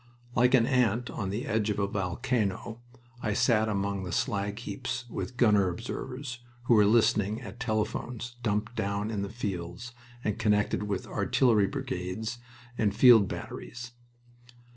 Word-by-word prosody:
Like 125 +2 +5
an 115 -3 +4
ant 120 -1 +1
on 100 -4 -3
the 110 +8 -3
edge 110 -4 0
of 105 - -1
a 100 - +1
volcano 105 +3 -2 0.4
I 105 - 0
sat 110 0 +3
among 100 -1 -1
the 90 - -5
slag 105 -4 -1
heaps 120 +2 -4
with 125 - -5
gunner 105 -6 +4
observers, 125 +6 -5 0.2
who 120 - +3
were 105 -2 +6
listening 110 -1 +3
at 120 - -9
telephones 115 +1 -2
dumped 110 +1 -1
down 100 0 -1
in 105 -3 -2
the 100 - -3
fields 100 0 -5 0.3
and 105 +1 -1
connected 105 -2 +2
with 100 -2 -2
artillery 110 -6 +2
brigades 95 +6 -4 0.4
and 105 -2 +2
field 115 -3 +7
batteries. 120 +4 -7
110 Hz, 145 wpm, -29 LUFS, 100-120 Hz, 0.4 s, field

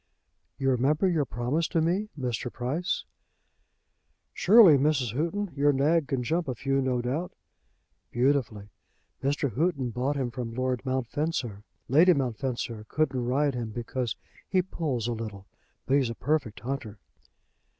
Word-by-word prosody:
"You 135 0 +1
remember 140 +8 +2
your 165 -5 +1
promise 125 +8 -1
to 170 - 0
me, 180 +6 0
Mr. 125 -1 -2
Price?" 140 +9 -2 1.3
"Surely, 200 -5 +7
Mrs. 135 -5 +1
Houghton. 170 +6 -1
Your 145 +1 +4
nag 145 +3 +2
can 135 -4 -1
jump 165 +6 0
a 130 - -2
few, 135 +3 0
no 125 -2 0
doubt." 150 +9 -2 0.8
"Beautifully. 120 -5 0 0.5
Mr. 140 -1 0
Houghton 140 -5 0
bought 130 +5 -1
him 130 -3 -2
from 115 -1 -5
Lord 130 -1 -1
Mountfencer. 130 -3 -2 0.3
Lady 165 +8 +6
Mountfencer 120 -4 -3
couldn't 135 -5 0
ride 140 +3 +2
him 120 -2 -3
because 120 +1 -3 0.3
he 185 -1 +2
pulls 140 - -2
a 120 - 0
little. 105 -4 -6 0.4
But 135 - +3
he's 130 -4 +1
a 115 - -5
perfect 140 -6 -1
hunter." 120 -4 -4
135 Hz, 140 wpm, -28 LUFS, 120-155 Hz, 1.3 s, Surely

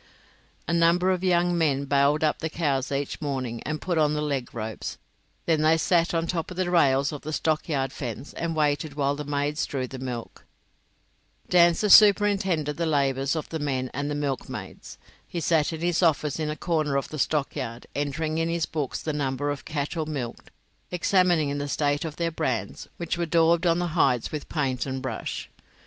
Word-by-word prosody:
A 170 - 0
number 170 +2 +4
of 185 0 -1
young 175 -1 +2
men 145 -4 +1
bailed 140 +2 +2
up 155 - +1
the 160 - -2
cows 145 -5 -1
each 140 +2 -3
morning, 130 -5 -3
and 155 0 -2
put 175 -3 -1
on 150 -1 +3
the 150 - -1
leg 140 -4 -2
ropes; 110 -1 -5 0.5
then 160 -2 +2
they 160 +1 +4
sat 170 +1 +2
on 165 -1 0
the - - -1
top 165 -3 -3
rails 170 -7 +2
of 150 - -6
the 155 - -5
stockyard 150 -4 -1
fence 130 +1 -6
and 165 -1 -3
waited 150 -1 0
while 140 -1 +1
the 150 - -5
maids 145 +1 -1
drew 130 -2 -2
the 130 +1 -8
milk. 125 -3 -6 1.1
Dancer 175 +3 +5
superintended 195 -8 +5
the 170 -1 0
labours 140 -1 +1
of 155 - -4
the 160 - -3
men 130 -3 -2
and 140 +1 -2
the 145 - -2
milkmaids. 145 -2 -5 0.3
He 175 - -4
sat 160 -2 +2
in 160 -1 -6
his 175 0 +1
office 155 -3 +2
in 155 -1 -1
a 150 - -2
corner 155 -4 0
of 140 - -2
the 155 - -6
stockyard, 130 -5 -2
entering 155 +2 -2
in 165 0 0
his 165 -1 0
books 150 -5 -3
the 155 - -2
number 145 0 -1
of 145 - -6
cattle 155 +1 -3
milked, 135 -6 -5
and - - -34 0.5
examining 175 -6 +2
the 145 - -3
state 145 +1 0
of 155 -2 -5
their 170 0 -1
brands, 115 -10 -3
which 170 0 -3
were 170 - 0
daubed 165 +1 +3
on 165 0 +3
the 175 0 -1
hides 125 -8 +2
with 150 -2 -5
paint 135 -4 -1
and 130 0 -4
brush. - - -4
150 Hz, 195 wpm, -26 LUFS, 140-165 Hz, 1.1 s, Dancer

